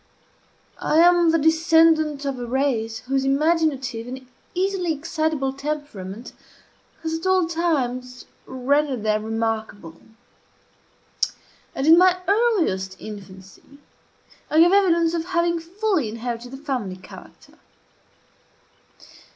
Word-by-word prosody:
I 310 - 0
am 345 0 +5
the 330 - +3
descendant 320 -2 +3
of 275 -2 -3
a 245 - -4
race 235 -4 -1
whose 270 +1 -1
imaginative 275 -5 0
and 260 +1 -8 0.3
easily 370 -2 0
excitable 310 -3 -2
temperament 270 -8 -6 0.7
has 320 0 -2
at 375 - -4
all 375 -2 +3
times 255 -7 -2 0.2
rendered 260 -1 0
them 215 0 0
remarkable; 220 -6 -4 1.7
and, 270 - -2
in 325 +2 +7
my 365 0 +5
earliest 370 - +1
infancy, 195 +5 -12 0.7
I 310 - +3
gave 345 +2 +6
evidence 340 -4 +3
of 330 -1 -2
having 340 -1 0
fully 360 - -1
inherited 235 +2 -5
the 270 - -9
family 255 -10 -4
character. 185 - -15
285 Hz, 110 wpm, -22 LUFS, 240-335 Hz, 1.7 s, in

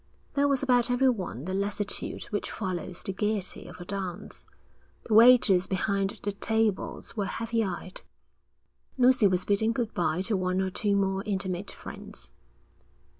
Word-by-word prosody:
There 285 0 +3
was 275 -1 +1
about 245 -2 +3
everyone 245 - +1
the 185 - -3
lassitude 200 +1 -2
which 205 - -2
follows 185 -3 -4
the 195 - -3
gaiety 205 -2 -2
of 175 +1 -11
a 175 - -8
dance. 190 -2 -5 0.6
The 220 - -2
waiters 220 -5 +7
behind 195 +1 -1
the 205 - 0
tables 220 +1 -1
were 205 -3 -1
heavy 230 0 -1
eyed. 185 -1 -4 1.0
Lucy 255 -3 +5
was 185 -1 0
bidding 220 +3 +2
good 230 -2 -2
bye 175 +1 0
to 210 +2 0
one 185 0 0
or 190 0 0
two 205 +1 0
more 195 -1 +1
intimate 190 -1 -2
friends. - - -9
200 Hz, 150 wpm, -28 LUFS, 185-225 Hz, 1.0 s, waiters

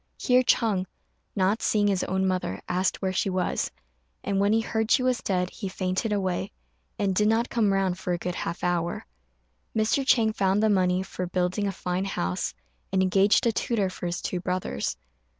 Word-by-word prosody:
Here 250 -1 +4
Ch'êng, 210 -6 +2 0.5
not 195 +3 +1
seeing 210 -1 +2
his 195 -2 +1
own 190 0 0
mother, 180 - -1
asked 185 +2 0
where 190 -1 0
she 190 - 0
was; 185 -1 -1 0.5
and 195 -1 0
when 200 +1 +3
he 225 +1 +3
heard 220 -1 -1
she 255 - +4
was 255 -1 +1
dead, 180 -2 -1
he 195 - -5
fainted 185 +3 -2
away, 190 -3 -1 0.5
and 195 -2 +1
did 210 +3 +3
not 225 +2 +1
come 220 -4 +2
round 190 -2 0
for 180 - -3
a 175 - +1
good 180 +1 -3
half 170 -1 -4
hour. 175 -1 -1 0.7
Mr. 220 +5 +2
Chang 225 -5 +3
found 195 +1 +1
the 220 - +4
money 185 -1 +2
for 180 -1 -5
building 180 +3 0
a - - 0
fine 185 0 -2
house, 90 - -2 0.4
and 190 0 +2
engaged 195 +4 +4
a 230 - +4
tutor 210 -4 0
for 180 - -5
his 175 +2 -3
two 180 - -2
brothers. 180 - -2
190 Hz, 190 wpm, -26 LUFS, 180-210 Hz, 0.7 s, Here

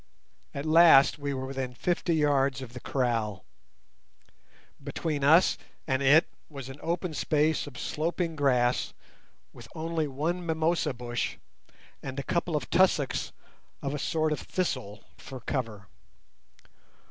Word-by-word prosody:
At 140 +1 -4
last 160 -3 +6
we 145 0 -3
were 130 -1 -3
within 130 -2 -4
fifty 175 +3 0
yards 140 -3 +2
of 120 -2 -10
the 125 - -7
kraal. 115 -7 -1 1.4
Between 150 -4 -3
us 160 +6 +5 0.3
and 130 0 0
it 145 +5 +6 0.2
was 135 -4 -8
an 135 +2 -9
open 170 0 -2
space 155 0 +1
of 135 -4 -10
sloping 165 +1 -2
grass 125 -4 +1 0.6
with - - -12
only 160 -1 -2
one 160 +6 -2
mimosa 160 -3 0
bush 120 0 -3 0.7
and 135 0 -6
a - - -3
couple 170 +2 -1
of 135 -4 -2
tussocks 175 -7 +2 0.5
of 140 - -2
a 145 - -3
sort 155 +1 0
of 150 - -1
thistle 120 - -3 0.2
for 130 -1 -9
cover. 115 -6 -4
145 Hz, 135 wpm, -28 LUFS, 130-160 Hz, 1.4 s, last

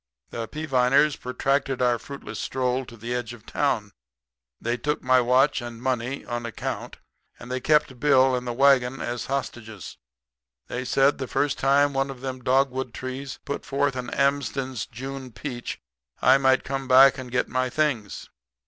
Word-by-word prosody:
"The 115 -1 -4
Peaviners 140 0 +2
protracted 135 +1 -1
our 120 -2 +2
fruitless 140 0 -8
stroll 130 0 -1
to 115 - -12
the 115 +3 -4
edge 120 -1 -3
of 110 - -19
town. - - -1 0.7
They 120 +1 -1
took 150 +4 -2
my 130 0 +4
watch 130 +3 +3
and 120 -1 -7
money 130 +1 -2
on 120 0 -4
account; 115 -2 -5 0.4
and 120 +1 -10
they 130 - -1
kept 150 -3 +2
Bill 130 -2 +4
and 125 0 -4
the - - -1
wagon 135 0 +3
as 120 0 -4
hostages. 110 -7 -5 0.7
They 125 +1 -4
said 135 +2 +3
the 130 - -3
first 145 +2 0
time 140 +1 +3
one 135 0 0
of 130 -2 -8
them 130 -1 -5
dogwood 130 -1 +1
trees 130 0 -6
put 140 - -4
forth 140 -1 0
an 125 -1 -4
Amsden's 140 -3 0
June 135 +1 -7
peach 120 0 -6 0.4
I 135 - +5
might 130 -1 +3
come 135 -1 -4
back 135 +1 +7
and 130 -1 -7
get 125 0 +1
my 130 0 -1
things. 130 -8 -1
130 Hz, 165 wpm, -25 LUFS, 125-135 Hz, 0.7 s, back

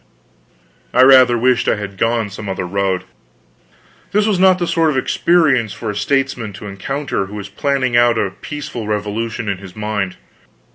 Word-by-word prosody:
I 125 - +7
rather 130 -2 +7
wished 125 +1 +2
I - - +3
had 105 -2 -6
gone 115 +1 0
some 105 0 -7
other 95 -1 -3
road. 95 0 -1 1.1
This 210 +1 +3
was 210 -4 +1
not 185 -1 +5
the 175 - -1
sort 165 -1 +2
of 145 - -1
experience 135 - +2
for 110 - -4
a - - -8
statesman 125 -1 -1
to 100 +3 -10
encounter 105 +2 -3
who 105 - -9
was 100 -1 -7
planning 130 +3 -1
out 120 -1 +4
a 100 -3 0
peaceful 120 0 -7
revolution 110 +2 -3
in 100 -2 -2
his 95 -2 -12
mind. 105 -3 -3
115 Hz, 175 wpm, -18 LUFS, 100-135 Hz, 1.1 s, I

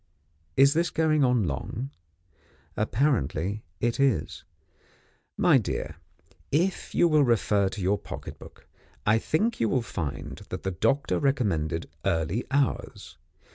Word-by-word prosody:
Is 140 +1 +6
this 170 +2 +1
going 155 -2 +2
on 125 -4 +3
long? 105 - -4 0.8
Apparently 105 - 0 0.2
it 120 +2 0
is. 130 - +1 0.9
My - - +5
dear, 75 - -4 0.5
if 175 +6 0
you 175 - +5
will 155 -3 +4
refer 105 -5 +2
to 105 +1 -6
your 100 +2 +1
pocket - - -8
book, - - -14 0.4
I 110 +2 +4
think 215 - 0
you 115 - +2
will 125 +1 +1
find 75 - -5
that - - -5
the 95 - -1
doctor 135 - +1
recommended 90 - 0 0.2
early 85 +8 0
hours. 140 0 -2
115 Hz, 130 wpm, -27 LUFS, 90-140 Hz, 0.9 s, Is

